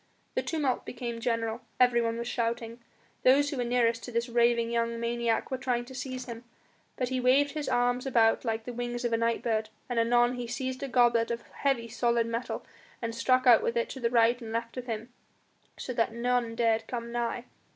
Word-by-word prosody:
The - - 0
tumult 290 -6 -1
became 235 -1 -5
general; 230 0 -1 0.2
everyone 235 -2 +3
was 235 0 -4
shouting. 235 -1 -2 0.4
Those 285 +3 +4
who 285 - -4
were 245 - 0
nearest 235 -1 +1
to 245 - -7
this 235 +1 -1
raving 235 0 +2
young 230 0 0
maniac 235 0 -1
were 260 - -2
trying 245 -2 -1
to 260 - -11
seize 255 -1 -5
him, 235 -1 -8 0.5
but 250 -1 -1
he 260 0 -1
waved 270 +3 +4
his 300 -1 -3
arms 245 +1 +1
about 230 -3 +3
like 225 -2 -2
the 245 - -5
wings 240 0 -3
of 235 - 0
a - - +3
night 230 0 0
bird, 220 -2 0 0.2
and 245 -2 0
anon 240 +2 +3
he 245 -1 -4
seized 255 +2 -4
a 275 - -2
goblet 240 -3 +3
of 235 0 -3
heavy 265 -5 -1
solid 235 0 +1
metal 230 +2 -4 0.3
and 230 -1 -3
struck 255 +2 +2
out 240 -3 +7
with 235 - -1
it 235 - 0
to 265 - -7
the 235 -2 +1
right 235 +1 +3
and 225 -1 -7
left 230 0 -3
of 250 -1 -6
him, 230 +1 -5 0.6
so 250 - -5
that 230 -1 +1
none 235 0 0
dared 225 -1 +1
come 235 -1 -5
nigh. 240 0 -2
235 Hz, 210 wpm, -29 LUFS, 230-250 Hz, 0.6 s, out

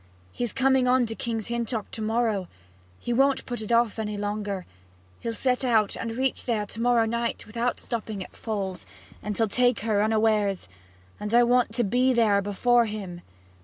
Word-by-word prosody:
He's 240 -3 -3
coming 265 -1 +3
on 250 0 +4
to 225 - -4
King's 225 -1 -3
Hintock 235 -2 -3
to 220 - -5
morrow 220 -4 0 0.5
he 240 - -3
won't 270 +2 +2
put 240 -2 -4
it 215 - -5
off 235 -1 +2
any 210 -1 -3
longer; 205 -2 -3 0.5
he'll 230 -1 -4
set 255 +1 +1
out 220 -5 +2
and 230 0 -5
reach 265 0 -1
there 220 -4 0
to 215 +2 -7
morrow 240 -1 +3
night, 235 +1 -2
without 235 +3 -2
stopping 215 -4 -4
at - - -15
Falls; 195 -4 -4 0.3
and 210 0 -4
he'll 225 - +2
take 245 +3 +2
her 210 -2 +1
unawares, 215 - +1 0.5
and 210 +2 -1
I 240 - +7
want 240 -2 +2
to 240 - +2
be 250 +5 +2
there 215 -4 +3
before 235 +4 +2
him.' 195 -5 -6
225 Hz, 180 wpm, -26 LUFS, 210-240 Hz, 0.5 s, I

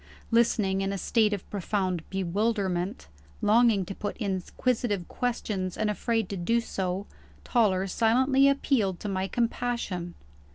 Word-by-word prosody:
Listening 215 -4 +2
in 195 0 -1
a 200 - -2
state 215 +2 +2
of 205 -3 -4
profound 190 -3 -1
bewilderment 190 - -1 0.3
longing 215 -2 +4
to 195 - -5
put 205 - -5
inquisitive 205 0 -1
questions, 210 -7 -2
and 215 -1 +1
afraid 225 0 -1
to 200 - -3
do 230 +7 +1
so 190 -4 -3 0.4
Toller 195 -6 +2
silently 260 +7 +3
appealed 230 -9 +1
to - - -4
my 190 -1 -1
compassion. 230 -7 -2
205 Hz, 130 wpm, -28 LUFS, 190-235 Hz, 0.4 s, longing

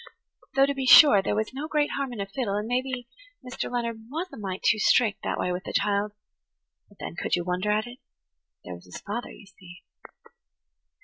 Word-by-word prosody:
Though, 275 0 +6
to 280 - -1
be 270 -2 -3
sure, 250 -8 +9
there 200 - -1
was 220 +3 -2
no 285 +4 -5
great 300 -2 0
harm 275 -2 -3
in 235 - -7
a 200 - -2
fiddle, 200 0 -3
and 210 +1 -2
maybe 255 +2 -1 0.5
[Page 250 - -9
82] - - -3
Mr. - - -9
Leonard 230 -2 -3
was 330 +6 -4
a - - -9
mite 190 -3 -5
too 215 - +3
strict 215 0 +3
that - - -2
way 180 - -1
with 180 +1 -4
the - - -7
child. 205 0 0 0.8
But - - -22
then, 85 - -7
could - - 0
you 175 - -2
wonder 180 +3 -2
at 215 +1 +1
it? 245 +1 -11 0.7
There 90 - -6
was 90 +1 -12
his 90 - -9
father, 235 +4 -5
you - - -13
see. 185 -2 -15
215 Hz, 225 wpm, -26 LUFS, 195-255 Hz, 0.8 s, sure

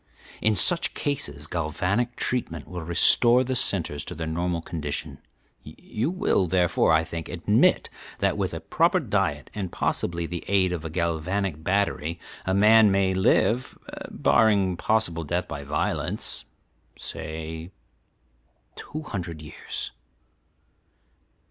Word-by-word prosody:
In 110 0 +2
such 170 - +4
cases 75 - -3
galvanic 90 +9 -1
treatment 85 - -3
will 90 -1 -6
restore 120 +9 +6
the 130 0 -2
centres 85 -11 0
to - - -7
their 80 - -4
normal 85 +2 -2
condition. 75 -4 -5 0.4
You 115 +7 -5
will, 185 - +1
therefore, 90 -2 +2
I 80 0 +4
think, 80 -1 -7
admit - - +2 0.3
that - - 0
with - - -4
proper - - +3
diet 75 -2 -2
and 95 -4 -4
possibly 85 -1 -2
the 85 +1 -5
aid 95 -2 +2
of 85 -3 -4
a 80 - -5
galvanic 85 +1 -2
battery 85 -4 -1 0.3
a 95 - +1
man 110 +1 +6
may 95 -1 +2
live, 110 +5 +1 0.3
barring 100 -5 +2
possible 85 -4 0
death 75 - -2
by 70 - -6
violence, 75 +2 -2 0.5
say, 80 +2 -6 1.1
two 155 +1 -7
hundred 85 - -6
years." 75 - -7
90 Hz, 125 wpm, -25 LUFS, 80-105 Hz, 1.1 s, restore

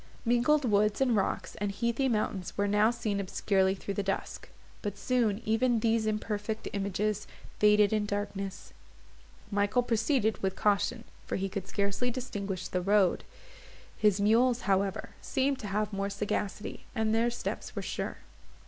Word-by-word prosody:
Mingled 250 +5 +3
woods, 210 -1 +2
and 255 -4 +3
rocks, 195 - -1
and 205 -1 0
heathy 235 +6 0
mountains 210 -5 -2
were 205 0 +2
now 210 +2 +4
seen 225 -4 -2
obscurely 190 0 +1
through 200 +1 -5
the 200 - -1
dusk; 195 0 -3 0.3
but 205 -2 -4
soon 235 -4 +1
even 230 +2 +2
these 225 -1 +2
imperfect 215 0 -2
images 200 +1 -1 0.3
faded 210 0 +5
in 210 -1 +1
darkness. 200 -1 -4 0.8
Michael 205 +4 +2
proceeded 225 -1 +1
with 190 -1 -1
caution, 210 +4 +1 0.2
for - - -2
he 195 0 -1
could 195 -1 -5
scarcely 200 +5 0
distinguish 205 -7 -4
the 180 - -1
road; 195 -1 +3 0.7
his 210 -2 +3
mules, 235 +4 +4
however, 195 -1 0
seemed 270 0 0
to 210 - -5
have 210 +1 -1
more 195 0 -1
sagacity, 205 0 -3
and 220 -1 +1
their 230 +2 +3
steps 240 - -5
were - - -3
sure. - - -3
210 Hz, 150 wpm, -30 LUFS, 200-230 Hz, 0.8 s, faded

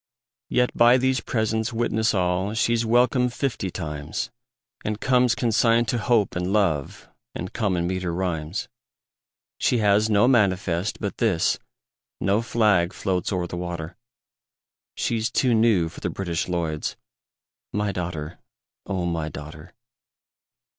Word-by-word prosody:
Yet 125 0 +1
by 120 +2 +6
these 130 0 +1
presents 110 0 -1
witness 115 -2 0
all 90 +3 0
She's 115 0 +2
welcome 125 +2 +3
fifty 120 -6 -2
times, 75 -3 -4 0.5
And 105 0 -2
comes 125 -2 +3
consigned 115 0 +2
to 120 - 0
Hope 110 -2 +2
and 90 +1 -1
Love 90 -10 0 0.3
And 90 - -5
common 95 -7 0
meter 90 -1 -2
rhymes. 85 0 -2 0.9
She 125 - +2
has 105 0 +3
no 105 +3 +4
manifest 95 -6 +1
but 100 -2 -4
this, 100 -8 +2 0.6
No 100 +4 +2
flag 105 -6 +2
floats 95 0 -1
o'er 90 -2 -1
the 85 - -6
water, 85 -2 -5 1.0
She's 115 0 -1
too 125 -2 +2
new 110 -7 +3
for - - -10
the - - -1
British 85 -4 -3
Lloyds 80 -3 -2 0.8
My 105 0 -1
daughter, 85 -3 -5 0.5
O 95 -3 -2
my 85 -3 -2
daughter! 75 +3 -10
100 Hz, 130 wpm, -24 LUFS, 85-115 Hz, 1.0 s, by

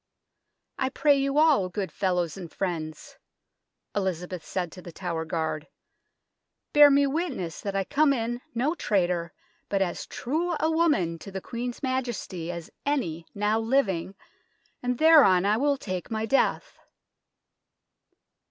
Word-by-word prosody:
" - - -56 0.3
I 265 - +1
pray 285 +1 +3
you 275 +1 0
all, 300 -12 +4
good 190 +1 -4
fellows 180 -4 0
and 175 -4 -8
friends," 160 -5 -5 0.8
Elizabeth 180 -3 -2
said 180 -3 -3
to 180 - -11
The 175 - -10
Tower 165 -2 -4
guard, 160 -2 -2 0.5
" - - -56
bear 295 -1 +9
me 280 0 +4
witness 275 - -3
that 200 -1 -4
I 195 - +1
come 290 +7 +3
in 240 -1 -2
no 265 +7 +1
traitor, 180 - 0 0.4
but 200 - +1
as 185 -3 -2
true 330 +7 -2
a 320 - +2
woman 290 - +2
to 180 - -9
the 190 - -4
Queen's 240 +6 -5
Majesty 240 -10 -3
as 170 -2 -8
any 170 - -2
now 210 +2 +1
living, 215 -7 0 0.7
and 250 0 -1
thereon 285 - +6
I 210 +2 +3
will 285 +2 +2
take 185 -8 -5
my 220 0 -2
death." 270 +5 0
205 Hz, 145 wpm, -27 LUFS, 180-275 Hz, 0.8 s, bear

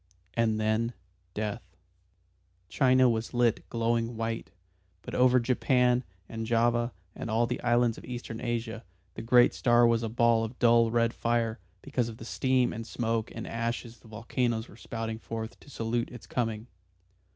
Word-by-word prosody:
And 110 -1 +1
then 110 +2 0 0.4
death. 105 +2 -4 0.9
China 130 -2 +4
was 115 +1 -1
lit 120 -2 +1
glowing 115 0 0
white, 115 0 -3 0.5
but - - -8
over 125 0 +5
Japan 125 0 +2 0.2
and 115 0 -5
Java 120 +1 +2 0.2
and 120 - -6
all 115 +2 +2
the 125 +1 -3
islands 120 -1 +2
of - - -13
Eastern 120 -2 -6
Asia 115 -2 -3 0.3
the - - -7
great 120 +2 +5
star 120 -1 +4
was 115 -1 +3
a 115 - -2
ball 115 0 +3
of 115 +3 -5
dull 115 -1 +5
red 115 0 +2
fire 115 -2 0 0.2
because 120 -2 -1
of 110 - -9
the 115 - -9
steam 130 0 +1
and 115 0 -6
smoke 115 -2 -2
and 115 - -5
ashes 115 0 -4
the 115 - -18
volcanoes 115 +1 -2
were - - -15
spouting 115 -1 -5
forth 115 0 -6
to - - -17
salute 115 -2 -2
its 120 -3 -11
coming. 115 -3 -2
115 Hz, 165 wpm, -29 LUFS, 115-120 Hz, 0.9 s, over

